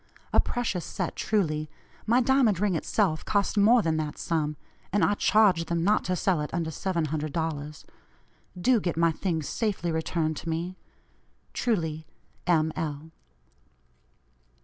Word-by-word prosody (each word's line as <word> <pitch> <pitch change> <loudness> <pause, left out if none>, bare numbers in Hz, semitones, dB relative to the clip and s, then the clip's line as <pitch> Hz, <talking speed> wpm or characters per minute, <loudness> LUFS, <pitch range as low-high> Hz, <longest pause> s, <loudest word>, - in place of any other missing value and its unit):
A - - +4
precious 225 -8 0
set, 185 -3 -4
truly. 155 -8 0 0.4
My 240 +3 +4
diamond 245 -7 +3
ring 205 -1 +1
itself 165 0 0
cost 205 0 0
more 215 +3 +5
than 160 -1 +1
that 155 -1 -3
sum, 155 -2 -1 0.4
and 205 +1 +3
I 205 - +2
charged 200 -5 +3
them 170 -1 0
not 210 +3 +3
to 180 - 0
sell 180 -2 +1
it 150 - -4
under 165 -1 -2
$700. 155 -3 -3 0.7
Do 245 +5 +4
get 175 -5 -2
my 165 0 +4
things 160 -3 -2
safely 200 -7 -1
returned 160 -1 -1
to 165 - -5
me. 170 +3 -3 0.8
"Truly, 160 -9 -1 0.4
"M. 160 -2 +3
L." 155 0 -4
170 Hz, 140 wpm, -27 LUFS, 155-205 Hz, 0.8 s, more